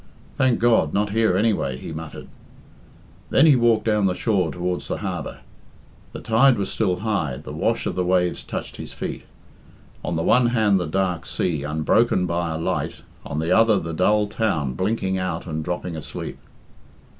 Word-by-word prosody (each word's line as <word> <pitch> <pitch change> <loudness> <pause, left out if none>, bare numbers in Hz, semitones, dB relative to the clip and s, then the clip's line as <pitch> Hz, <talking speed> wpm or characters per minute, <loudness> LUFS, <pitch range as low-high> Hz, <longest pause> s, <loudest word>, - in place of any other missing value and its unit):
"Thank 130 -2 +2
God, 115 -10 +3
not 105 0 +1
here, 110 -4 +2
anyway!" 100 - +1
he 80 - -7
muttered. 80 0 -8 1.0
Then - - +5
he 150 -4 +7
walked 115 -3 +3
down 105 -3 +2
the 90 - 0
shore 95 -8 0
towards 90 0 -3
the - - -2
harbour. - - -5 0.7
The - - -8
tide 120 +3 +4
was 100 -1 -2
still 90 -5 0
high, 100 - -1
the - - -9
wash - - 0
of - - -1
the 90 - -1
waves 90 -1 +1
touched - - -6
his - - -8
feet; - - -5 0.8
on 85 - -2
the 80 - -1
one 125 +5 +4
hand 110 -5 +3
the 90 - -2
dark 90 0 -1
sea, 80 -5 -1
unbroken 80 +7 +2
by 85 -1 -1
a 80 - -3
light, 80 - -3 0.2
on 70 - -5
the 80 +2 -1
other 110 -2 +5
the 80 0 -4
dull 105 +5 +3
town 100 - -1
blinking 95 - -1
out 90 -3 -3
and 80 -2 -4
dropping 90 0 -4
asleep. 80 - -6
95 Hz, 180 wpm, -23 LUFS, 85-110 Hz, 1.0 s, he